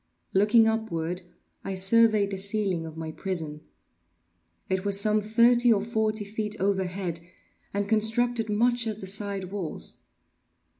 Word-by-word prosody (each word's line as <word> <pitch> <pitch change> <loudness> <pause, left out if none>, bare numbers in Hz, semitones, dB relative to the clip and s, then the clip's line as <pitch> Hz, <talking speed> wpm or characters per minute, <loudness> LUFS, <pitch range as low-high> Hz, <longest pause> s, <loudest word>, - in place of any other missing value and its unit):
Looking 215 +3 +4
upward, 180 -6 -2 0.4
I 195 - -4
surveyed 210 +1 +5
the 195 - -3
ceiling 195 -4 -1
of 160 0 -10
my 160 -1 -5
prison. 160 -4 -5 1.1
It 190 0 -1
was 200 -1 +3
some 215 +1 +2
thirty 235 +3 +4
or 205 -3 +2
forty 220 -1 -1
feet 210 0 -4
overhead, 190 -3 -2 0.5
and 200 0 -2
constructed 225 +1 +1
much 235 +2 +1
as 215 -2 -3
the 195 - -8
side 195 -1 -3
walls. 195 -6 -5
205 Hz, 135 wpm, -26 LUFS, 190-220 Hz, 1.1 s, surveyed